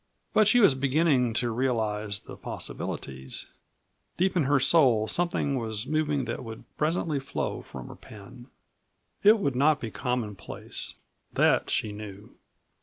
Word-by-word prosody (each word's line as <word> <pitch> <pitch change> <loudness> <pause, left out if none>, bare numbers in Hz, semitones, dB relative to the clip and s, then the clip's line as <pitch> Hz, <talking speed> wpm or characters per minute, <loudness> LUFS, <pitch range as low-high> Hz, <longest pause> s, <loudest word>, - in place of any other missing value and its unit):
But 215 -2 +5
she 245 - +5
was 200 - +6
beginning 135 -3 +2
to 120 -1 0
realize 110 -4 -1
the - - -10
possibilities; 65 -1 -6 0.7
deep 190 +2 +1
in 165 -6 +2
her 140 +1 +3
soul 130 -6 +4
something 170 -1 0
was 110 -1 -4
moving 150 -2 0
that 115 - -4
would 115 -1 -8
presently 155 -1 0
flow 135 - -3
from - - -9
her - - -10
pen. 120 +4 -13 0.7
It 215 +2 +7
would 140 - -1
not 145 +3 +4
be 115 - -5
commonplace 120 -6 -4 0.4
that - - +3
she 115 -4 0
knew. 105 -1 -9
125 Hz, 140 wpm, -27 LUFS, 110-150 Hz, 0.7 s, It